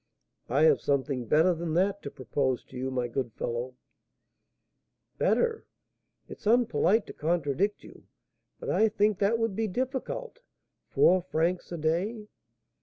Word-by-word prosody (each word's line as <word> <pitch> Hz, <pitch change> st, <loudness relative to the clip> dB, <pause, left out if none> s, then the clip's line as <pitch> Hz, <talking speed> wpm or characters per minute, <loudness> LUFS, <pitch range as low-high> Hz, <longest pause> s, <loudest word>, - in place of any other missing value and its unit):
"I 140 Hz, +6 st, +3 dB
have 160 Hz, -, +5 dB
something 135 Hz, -3 st, -1 dB
better 160 Hz, -, +4 dB
than 165 Hz, -1 st, -3 dB
that 195 Hz, +3 st, +1 dB
to -, -, -6 dB
propose 130 Hz, -1 st, -2 dB
to -, -, -16 dB
you, 130 Hz, +1 st, -3 dB
my 125 Hz, -2 st, -1 dB
good 120 Hz, -1 st, -3 dB
fellow." 120 Hz, +3 st, -4 dB, 1.4 s
"Better! 460 Hz, -2 st, +1 dB, 0.6 s
It's -, -, -9 dB
unpolite 230 Hz, -2 st, +3 dB
to -, -, -9 dB
contradict 170 Hz, +4 st, -1 dB
you, -, -, -15 dB, 0.5 s
but -, -, -3 dB
I 220 Hz, -, +3 dB
think 210 Hz, -1 st, +1 dB
that 210 Hz, +3 st, +2 dB
would 225 Hz, -3 st, -1 dB
be 225 Hz, +1 st, 0 dB
difficult. 260 Hz, -, -4 dB, 0.5 s
Four 185 Hz, +1 st, +4 dB
francs 175 Hz, +1 st, -1 dB
a 170 Hz, -, -3 dB
day!" 180 Hz, +8 st, -1 dB
175 Hz, 140 wpm, -28 LUFS, 140-215 Hz, 1.4 s, have